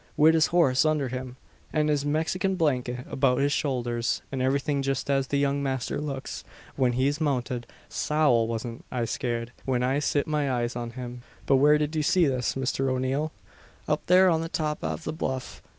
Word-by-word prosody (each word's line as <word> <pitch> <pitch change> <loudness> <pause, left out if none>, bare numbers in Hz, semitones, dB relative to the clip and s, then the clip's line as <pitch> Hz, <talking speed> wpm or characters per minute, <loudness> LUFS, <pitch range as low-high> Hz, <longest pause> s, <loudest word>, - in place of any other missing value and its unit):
Wid 155 +2 +6
his 160 -1 +4
horse 155 -7 +3
undher 155 -4 +1
him, 130 0 -5 0.4
an 155 -1 +1
his 145 -2 +1
Mexikin 160 +6 0
blanket 125 -6 0
about 130 -2 +2
his 140 +2 +2
showlders, 120 -5 -1
an 135 -1 -2
everything 140 +2 +1
just 135 0 -1
as 135 -1 +1
the 140 - 0
young 140 0 +1
masther 130 -1 -2
looks, 140 -3 -5 0.3
when 125 -2 +2
he's 140 +5 0
mounted, 125 -4 -1 0.2
Sowl! 120 +1 +2
wasn't 115 +1 -5
I 120 -2 -1
scared, 120 0 -3 0.2
whin 125 -2 +1
I 135 +3 +1
sit 145 -1 +1
my 150 -3 0
eyes 120 -1 -1
on 120 -1 -4
him." 125 -1 -6 0.2
"But 135 - +4
where 150 +3 +5
did 150 +1 -2
you 155 - +1
see 180 +3 +3
this, 130 -4 0
Mr 135 0 0
O'Neal?" 130 +4 -1 0.6
"Up - - 0
thare 185 +1 +6
on 165 -3 +3
the 165 - -4
top 150 -2 -2
av 80 0 -3
the - - -3
bluff. 130 -5 -4
135 Hz, 190 wpm, -27 LUFS, 125-150 Hz, 0.6 s, Wid